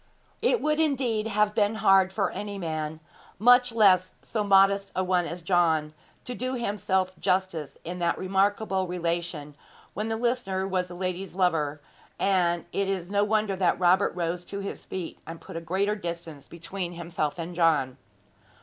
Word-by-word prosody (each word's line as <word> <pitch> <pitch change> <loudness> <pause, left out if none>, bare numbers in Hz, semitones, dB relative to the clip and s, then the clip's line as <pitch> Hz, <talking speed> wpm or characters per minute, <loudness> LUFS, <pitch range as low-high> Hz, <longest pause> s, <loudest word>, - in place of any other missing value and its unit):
It 475 0 +3
would, 305 0 +1
indeed, 255 -8 +1
have 210 -1 +1
been 210 0 +2
hard 195 -3 +4
for 195 +1 0
any 205 -1 -5
man, 160 -3 -4 0.4
much 245 +3 +5
less 190 -5 +4
so 215 -2 -2
modest 195 0 +4
a 185 - +1
one 180 -1 +1
as 170 0 -6
John, 165 -4 +2 0.3
to 250 - -4
do 255 +2 -3
himself 200 -5 0
justice 185 -5 -1
in 180 +2 -5
that 170 -1 +1
remarkable 195 0 0
relation, 170 -4 -3 0.4
when 215 +3 -3
the 225 - 0
listener 220 -5 -1
was 185 -1 -1
the 175 - -9
lady's 185 0 -4
lover; 155 -6 +1 0.4
and 175 -3 +1
it 200 -1 -1
is 190 -1 -3
no 205 0 +3
wonder 210 -1 +1
that 185 -2 +2
Robert 185 +2 +3
rose 175 0 -2
to 200 - -6
his 200 - -6
feet 185 -3 -6
and 165 0 -7
put - - -11
a 165 - -3
greater 195 +5 0
distance 170 -6 -7
between 175 +1 -6
himself 170 -3 -3
and 170 +1 -5
John. 155 -7 +2
185 Hz, 170 wpm, -27 LUFS, 170-205 Hz, 0.4 s, much